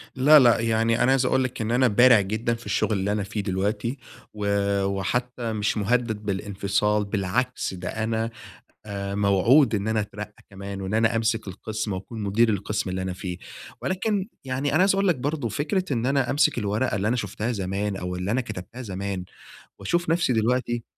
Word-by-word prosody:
لا، 145 +4 +7
لا، 120 -3 +5
يعني 115 +1 +2
أنا 125 - +4
عايز 135 -1 +3
أقول 130 +1 +2
لك 130 -2 -4
إن 110 +1 -1
أنا 125 +1 +4
بارع 120 0 +6
جدًا 110 +4 -1
في 115 0 -8
الشغل 110 - 0
اللي 100 +2 0
أنا 105 -1 0
فيه 105 +2 -3
دلوقتي، 105 +6 -2 0.4
و 105 -1 -4 0.4
وحتى 115 +5 -2
مش 105 0 0
مهدد 110 0 0
بالانفصال 105 +1 0
بالعكس 100 +5 -1
ده 90 -1 -5
أنا 110 +1 -1 0.6
آآ، 100 -1 -4
موعود 105 +6 +4
إن 100 +1 -1
أنا 110 0 +1
أترقى 105 0 -8
كمان، 100 0 -7
وإن 95 +2 -3
أنا 115 +1 +3
أمسك 115 -1 0
القسم 105 +2 -4
وأكون 100 +4 -6
مدير 105 +4 +3
القسم 105 -1 -1
اللي 95 0 -2
أنا 95 0 -3
فيه، 90 -1 -6 0.4
ولكن 195 +1 -1 0.2
يعني 135 +2 -1
أنا 155 - +3
عايز 195 +1 +4
أقول 195 0 +2
لك 175 - +3
برضو 140 -1 -2
فكرة 170 - -1
إن 120 -1 0
أنا 135 -2 +1
أمسك 140 -3 +2
الورقة 105 +2 0
اللي 100 +2 0
أنا 125 - +1
شفتها 105 +1 -3
زمان 100 0 -2
أو 90 -1 -4
اللي 90 +3 -3
أنا 125 - +2
كتبتها 110 +1 -7
زمان 95 -3 -4 0.6
وأشوف 175 - -1
نفسي 165 -5 +2
دلوقتي 120 +1 0
110 Hz, 185 wpm, -25 LUFS, 100-125 Hz, 0.6 s, لا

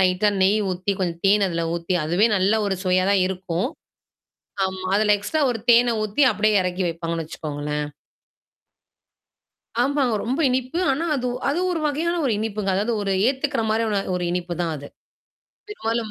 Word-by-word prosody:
லைட்டா 185 +3 +3
நெய் 200 +3 +4
ஊத்தி, 185 +2 -1
கொஞ்சம் 170 -2 -2
தேன் 200 0 +4
அதில 170 -1 -2
ஊத்தி, 170 +2 -2
அதுவே 175 +8 +3
நல்ல 195 +3 +2
ஒரு 195 -1 -1
சுவையா 185 +1 +2
தான் 200 -2 +3
இருக்கும். 185 +1 -2 1.0
ஆமா. 190 0 -6
அதுல 210 0 +3
எக்ஸ்ட்ரா 295 +10 -1
ஒரு 235 - -2
தேன 240 0 +5
ஊத்தி 215 +7 0
அப்படியியே 210 -1 +2
இறக்கி 180 +1 -2
வைப்பாங்கன்னு 165 0 -3
வெச்சுக்கோங்களேன். 150 -1 -4 2.0
ஆமாங்க. 275 -2 +1
ரொம்ப 255 +6 -1
இனிப்பு. 255 +6 -1
ஆனா, 310 +6 -1
அது 250 -2 -2 0.2
அது 310 +5 0
ஒரு 335 - -1
வகையான 330 +4 -1
ஒரு 250 - +2
இனிப்புங்க. 210 -2 -2
அதாவது 215 +5 0
ஒரு 200 -1 -1 0.2
ஏத்துக்கற 270 -1 0
மாரியான 220 -2 +1 0.2
ஒரு 180 - -2
இனிப்பு 175 0 -2
தான் 165 -2 -1
அது. 145 -1 -9 0.8
பெரும்பாலும் 230 - -3
200 Hz, 155 wpm, -23 LUFS, 180-240 Hz, 2.0 s, தேன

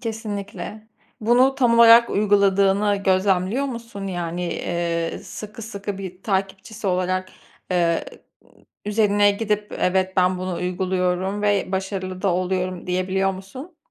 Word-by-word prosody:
Kesinlikle. 215 -1 -6 0.3
Bunu 245 +4 +4
tam 240 -3 +3
olarak 235 0 +8
uyguladığını 200 0 +3
gözlemliyor 190 +6 +2
musun? 230 -6 -6
Yani, 175 -1 -3 0.5
ııı, - - -6
sıkı 215 +2 -9
sıkı 205 -2 -6
bir 185 -1 -8
takipçisi 195 +1 -3
olarak, 185 0 0 0.4
ııı, 170 -2 +2 0.4
ııı, - - -26 0.2
üzerine 205 -1 +3
gidip 210 0 -2
"Evet, 190 0 +1
ben 185 0 +3
bunu 185 0 -3
uyguluyorum 185 +2 -1
ve 205 -2 +1
başarılı 190 -1 -3
da 200 - +2
oluyorum." 185 0 -2
diyebiliyor 185 +1 0
musun? 255 - -10
195 Hz, 120 wpm, -22 LUFS, 185-210 Hz, 0.5 s, olarak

